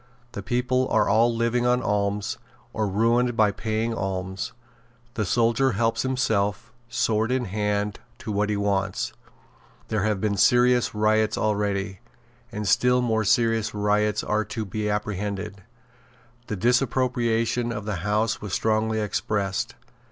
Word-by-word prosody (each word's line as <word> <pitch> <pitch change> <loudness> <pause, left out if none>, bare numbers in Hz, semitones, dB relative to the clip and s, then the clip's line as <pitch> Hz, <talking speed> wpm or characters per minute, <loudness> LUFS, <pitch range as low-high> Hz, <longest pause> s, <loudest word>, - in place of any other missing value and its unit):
The 100 - -6
people 125 +2 0
are - - +3
all 115 +4 +4
living 120 +1 0
on 125 0 +2
alms, 105 0 -1 0.3
or 110 -1 0
ruined 115 +4 +1
by 105 -2 +4
paying 110 +3 -2
alms. 95 -2 -3 0.6
The 110 -2 -1
soldier 115 +5 +2
helps 115 +2 +1
himself, 115 -3 -1 0.2
sword 115 0 0
in 130 -1 0
hand, 105 0 -1 0.2
to 110 - -6
what 105 +1 0
he 105 - 0
wants. 100 -1 -1 0.8
There 110 -2 0
have 105 -1 0
been 100 0 0
serious 120 +4 +4
riots 110 0 +2
already; 100 -2 -1 0.5
and 105 -1 -4
still 125 +6 +3
more 110 -2 +1
serious 110 +1 +2
riots 105 0 +1
are 110 +1 0
to 110 -2 -4
be 105 +2 -3
apprehended." 105 -1 -3 0.9
The 105 - -3
disapprobation 120 0 +1
of 105 -3 -5
the 105 -3 -2
House 105 +5 0
was 105 -3 -6
strongly 110 0 +1
expressed. 105 +2 -2
110 Hz, 135 wpm, -25 LUFS, 105-115 Hz, 0.9 s, all